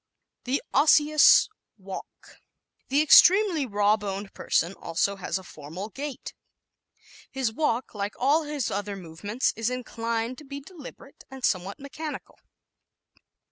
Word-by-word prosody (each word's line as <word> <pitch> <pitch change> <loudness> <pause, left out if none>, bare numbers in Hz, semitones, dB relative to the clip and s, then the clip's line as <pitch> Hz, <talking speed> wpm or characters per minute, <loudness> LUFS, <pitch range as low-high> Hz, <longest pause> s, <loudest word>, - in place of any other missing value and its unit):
The 260 +3 -1
Osseous 300 +1 +6 0.3
Walk 190 -1 -8 0.2
¶ - - -18 0.5
The 285 +3 +3
extremely 355 -1 +6
raw 205 0 +2
boned 200 -1 -6
person 170 - 0
has 195 - -12
also 180 +4 -1
a 190 0 -4
formal 165 +6 -8
gait. 280 +4 -7 1.0
His 260 -5 -2
walk, 250 -3 -1
like 205 -1 -4
all 285 +6 +3
his 295 -5 -3
other 205 0 -3
movements, 195 +7 -3
is 225 +1 -1
inclined 230 -1 -3
to - - -12
be 280 0 -7
deliberate 285 -3 -13
and 265 -2 -4
somewhat 190 +1 -1
mechanical. 295 +2 -8
235 Hz, 130 wpm, -26 LUFS, 200-285 Hz, 1.0 s, Osseous